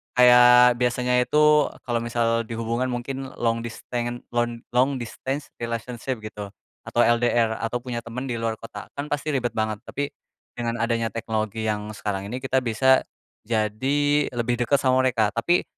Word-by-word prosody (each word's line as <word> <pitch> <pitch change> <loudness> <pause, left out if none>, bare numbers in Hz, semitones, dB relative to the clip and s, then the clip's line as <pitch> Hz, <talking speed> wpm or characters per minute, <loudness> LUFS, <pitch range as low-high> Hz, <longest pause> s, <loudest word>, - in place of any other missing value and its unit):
Kayak, 125 0 +7
biasanya 125 0 +1
itu 150 +2 +4 0.2
kalau 120 -1 +1
misal 115 0 0
dihubungkan 115 +2 -2
mungkin 130 +2 -4
long 115 -1 0
disten 120 +1 -5
lon 120 0 0 0.2
long 130 +2 +3
distance 135 +4 -5
relationship 120 +1 -4
gitu 105 -2 -8 0.3
atau - - -3
LDR, 120 -1 +2
atau 115 +2 -2
punya 125 -2 -3
temen 115 +3 -6
di 125 - -2
luar 115 -1 -2
kota 115 - -9
kan 140 +1 -4
pasti 145 +1 -1
ribet 120 -3 0
banget. 110 -1 -1
Tapi, 145 0 -2 0.4
dengan 120 -1 -3
adanya 115 -1 0
teknologi 110 0 -3
yang 105 -1 -2
sekarang 100 -2 -3
ini 125 +5 -4
kita 130 0 +2
bisa 130 +2 +3 0.5
jadi 110 +5 0 0.4
lebih 120 0 -1
deket 125 +4 +3
sama 130 -1 +2
mereka. 115 -5 +2
Tapi 170 +10 +2
120 Hz, 155 wpm, -24 LUFS, 115-125 Hz, 0.5 s, Kayak